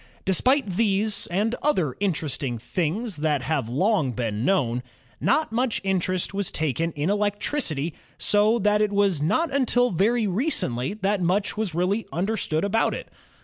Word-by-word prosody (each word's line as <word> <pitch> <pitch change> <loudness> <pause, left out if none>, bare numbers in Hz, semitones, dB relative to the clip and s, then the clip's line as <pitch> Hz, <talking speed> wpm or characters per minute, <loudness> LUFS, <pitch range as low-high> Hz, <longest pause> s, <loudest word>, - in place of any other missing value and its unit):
Despite 255 - +3
these 205 +1 +1
and 205 +6 0
other 180 - +1
interesting 150 -9 -1
things 180 - -2
that 150 -3 0
have 140 -8 -1
long 155 - +1
been 115 -3 -2
known, 125 -8 +1 0.4
not 310 -4 +1
much 240 0 0
interest 185 -1 -1
was 200 -2 -1
taken 155 +2 -1
in 150 +5 -1
electricity 205 - -1 0.2
so 210 +2 +3
that 210 -1 +2
it 210 -1 +2
was 200 -6 +2
not 295 - +1
until 245 -3 +2
very 220 +6 +2
recently 195 - -1
that 200 -1 0
much 185 +4 0
was 210 -6 -2
really 190 +6 0
understood 180 -2 -1
about 225 +3 +1
it. - - -8
195 Hz, 145 wpm, -24 LUFS, 155-215 Hz, 0.4 s, Despite